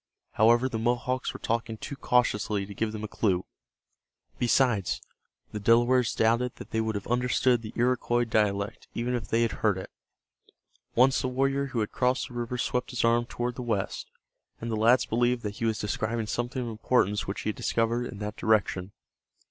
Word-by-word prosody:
However, 120 +4 +4
the 115 -4 -3
Mohawks 125 +2 0
were - - -9
talking 115 -1 -2
too 140 - -6
cautiously 110 -6 +1
to 100 - -9
give 110 +2 -1
them 110 0 -6
a - - -2
clue. 95 -4 0 0.9
Besides, 120 -5 +2 0.5
the 105 - -4
Delawares 120 +2 +3
doubted 115 +2 +2
that - - -11
they 110 - +1
would 110 -1 -2
have 100 - -4
understood 125 0 +2
the 110 -1 -7
Iroquois 120 0 +1
dialect 105 -2 0
even 120 +2 -1
if 120 -3 -2
they 115 +1 +2
had 115 - +1
heard 105 -4 +2
it. 95 - -7 1.0
Once 130 +3 +4
the - - -1
warrior 135 +2 0
who 125 -4 -2
had 105 - -2
crossed 125 +1 0
the - - -12
river 120 +1 -3
swept 125 +1 -1
his 125 -3 0
arm 120 +1 +3
toward 120 +1 -3
the 125 - -6
west, 115 -5 -2 0.5
and 115 0 -4
the - - 0
lads 115 +4 +4
believed 120 +1 +1
that 105 -1 -4
he 115 - -2
was 110 -1 +1
describing 110 +2 -2
something 120 +4 -2
of 120 - -4
importance 110 -2 +1
which 100 - -3
he - - -2
had 110 - -2
discovered 115 +1 0
in 105 - -8
that 105 0 -5
direction. 100 -3 +1
115 Hz, 190 wpm, -28 LUFS, 110-125 Hz, 1.0 s, However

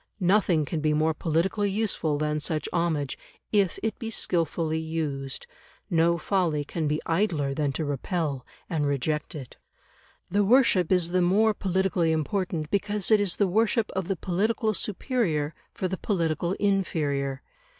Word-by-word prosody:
Nothing 180 -4 +3
can 160 +3 -3
be 155 0 +2
more 155 +1 +2
politically 175 +7 0
useful 195 -7 0
than 150 0 -1
such 155 +1 -2
homage, 160 -5 -1 0.3
if 200 -4 +2
it 220 -2 -2
be 225 -3 -4
skilfully 165 -5 0
used; 150 -4 -4 0.5
no 170 0 +3
folly 170 -4 0
can 160 +1 -2
be 150 +1 0
idler 165 -6 0
than 145 0 0
to 155 - -2
repel 145 -1 -2 0.2
and 150 -4 0
reject 150 +4 -1
it. 135 -5 -9 0.7
The 205 +3 +2
worship 205 -6 +4
is 180 -2 +3
the 180 +1 +2
more 210 +5 +4
politically 190 -3 +1
important 160 0 -1
because 205 0 0
it 215 - +6
is 200 -3 +1
the 205 - +2
worship 220 +3 +1
of 190 -2 -3
the 195 -2 -1
political 215 +5 0
superior 185 - -1 0.2
for 185 - -3
the 185 0 -4
political 170 -3 0
inferior. 150 -10 0
170 Hz, 150 wpm, -26 LUFS, 155-195 Hz, 0.7 s, it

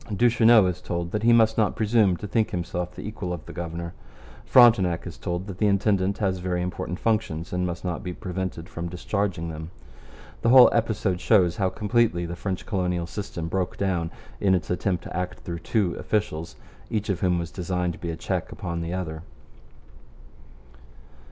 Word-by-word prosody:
Duchesneau 115 0 +5
is 90 -2 -2
told 85 0 -3
that 105 - -1
he 115 +2 +4
must 110 -1 +4
not 105 - +2
presume 105 -4 +3
to - - -7
think 110 +1 +1
himself 90 0 -3
the - - -7
equal 105 -4 -5
of 85 -3 -5
the - - -9
governor. 85 0 -5 0.5
Frontenac 100 -9 +5
is - - -7
told 85 +1 -4
that 95 -3 -8
the 105 - +3
intendant 100 -1 +2
has 95 -3 0
very 90 -1 -1
important 90 -1 -4
functions 105 -8 -1
and 90 0 0
must 85 +1 -5
not 90 -2 -2
be 90 - -4
prevented 90 -3 -5
from 85 -1 -5
discharging 90 -1 -2
them. 80 0 -7 0.7
The 115 - +2
whole 125 0 +9
episode 110 -5 0
shows 90 -6 +3
how 95 -2 +2
completely 105 -4 +1
the 85 +1 -5
French 95 +1 -4
colonial 90 -4 -1
system 85 -3 -5
broke 90 +1 -2
down 90 -4 0 0.3
in 95 -2 +3
its 90 -2 -2
attempt 90 0 -1
to - - -8
act 90 0 -3
through 85 -1 -5
two 90 0 0
officials, 85 -6 -2 0.3
each 105 -1 -2
of 95 -3 0
whom 90 -2 +2
was 85 -1 -4
designed 90 -1 -2
to - - -12
be 85 - -4
a 80 - -3
check - - -3
upon 85 -1 -4
the 85 +2 -3
other. 80 -4 -4
90 Hz, 185 wpm, -25 LUFS, 85-105 Hz, 0.7 s, whole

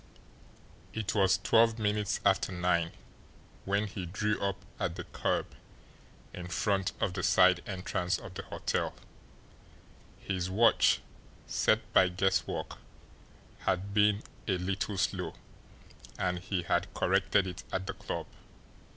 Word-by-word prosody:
It 110 -2 -2
was 95 -3 +4
twelve 115 +3 +4
minutes 105 -2 0
after 95 -1 +3
nine 90 -2 +1 0.7
when 100 +2 +1
he 95 -3 -5
drew 105 +4 -1
up 100 -1 0 0.2
at 85 -2 -1
the 90 - -5
curb - - -2 0.8
in 90 0 -6
front 95 +1 0
of 90 - 0
the 95 - -2
side 90 -1 +5
entrance 90 -2 -1
of - - -10
the - - -5
hotel - - -2 1.2
his 95 -2 -3
watch, 115 +5 +4 0.4
set - - +1
by 95 - +6
guesswork, 95 +1 -1 0.8
had 95 +2 -1
been 105 0 +3 0.2
a 95 -3 +2
little 95 +3 -2
slow, - - -1 0.8
and 90 -1 0
he 90 0 -2
had - - 0
corrected 100 -2 +2
it 90 -1 -6
at 95 0 -2
the 100 - -3
club. - - -5
95 Hz, 125 wpm, -31 LUFS, 90-100 Hz, 1.2 s, by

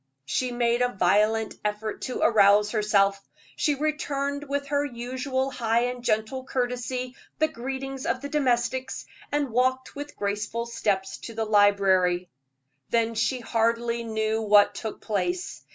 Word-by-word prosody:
She 250 - -1
made 240 0 +1
a 245 0 +2
violent 210 +4 +2
effort 210 +1 -3
to 255 - -4
arouse 210 -1 +5
herself. 200 -2 +2 0.3
She 295 - +1
returned 285 -1 -2
with 280 0 -1
her 285 -1 +1
usual 260 +1 -2
high 230 -2 +1
and 245 0 -2
gentle 220 +3 0
courtesy 250 0 -3 0.2
the 315 - +3
greetings 270 -1 -5
of 260 - 0
the 285 - -5
domestics, 260 -2 0 0.3
and 290 -3 0
walked 255 +2 0
with 290 +1 -7
graceful 210 +3 -2
steps 205 -5 -1
to 230 - -9
the 225 0 -1
library; 195 -4 +3 0.6
then 230 -1 +1
she 245 +3 0
hardly 235 +1 0
knew 220 0 -1
what 205 -1 +5
took 220 -2 -6
place. 350 - -2
235 Hz, 140 wpm, -26 LUFS, 215-260 Hz, 0.6 s, arouse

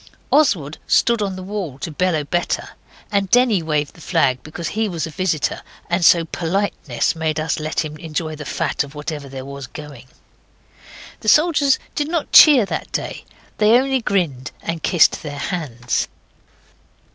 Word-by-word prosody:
Oswald 175 - +2
stood 235 -2 +3
on 195 -2 -2
the 185 - -7
wall 190 -8 -5
to 160 - -5
bellow 160 -1 0
better, 175 +4 -2 0.4
and 200 -2 +1
Denny 240 -5 +4
waved 150 -2 -1
the 165 - -16
flag 135 -7 +1
because 155 +4 -6
he 220 0 -1
was 165 -4 -3
a 160 - -7
visitor, 160 -3 -1 0.3
and 175 +1 +1
so 170 0 +6
politeness 175 +5 -1
made 160 -1 -1
us 160 +1 -1
let 155 +1 -2
him 150 0 -7
enjoy 155 0 -4
the 150 - -7
fat 145 - -1
of 140 0 -12
whatever 150 -1 -6
there 130 -1 -7
was 140 -1 -8
going. 145 -4 -11 1.1
The 215 - 0
soldiers 300 -3 +4 0.2
did 295 - -1
not 325 -2 -2
cheer 280 -8 +8
that - - -5
day; - - -4 0.3
they 215 +1 +5
only 265 -1 0
grinned 160 - -1
and 165 -1 -3
kissed 175 -4 +3
their 145 -2 -6
hands. 140 -7 -2
165 Hz, 165 wpm, -20 LUFS, 150-200 Hz, 1.1 s, cheer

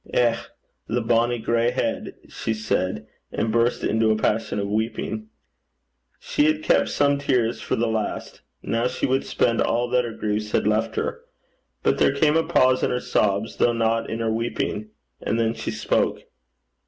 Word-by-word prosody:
'Eh! 120 -2 +3 0.5
the 120 - 0
bonnie 120 +1 +2
gray 115 +1 +1
heid!' - - -2
she 110 - -3
said, 95 -7 -1 0.3
and 110 - -1
burst 115 +1 +1
into 110 0 +2
a 110 - +3
passion 110 0 0
of 100 -1 -1
weeping. 110 0 -2 0.9
She 145 - 0
had 155 0 +1
kept - - +3
some 140 -1 +2
tears 125 -5 0
for - - -1
the 115 - 0
last. 110 -2 -3 0.2
Now 115 +2 0
she 125 0 -2
would 130 +1 +1
spend 115 -2 +1
all 120 +1 +1
that 125 0 +2
her 115 -2 -5
griefs 105 0 -3
had - - +2
left 110 +1 +1
her. 470 - -2 0.6
But - - +2
there 135 - +3
came 150 +2 +3
a 165 - +5
pause 130 -4 +3
in - - +1
her 125 - 0
sobs, 105 -1 0
though 120 - +3
not 115 0 0
in 115 +1 -3
her 115 -1 0
weeping, 110 -2 -2 0.3
and 115 - -1
then 115 0 +1
she - - -5
spoke. - - 0
115 Hz, 180 wpm, -24 LUFS, 110-125 Hz, 0.9 s, a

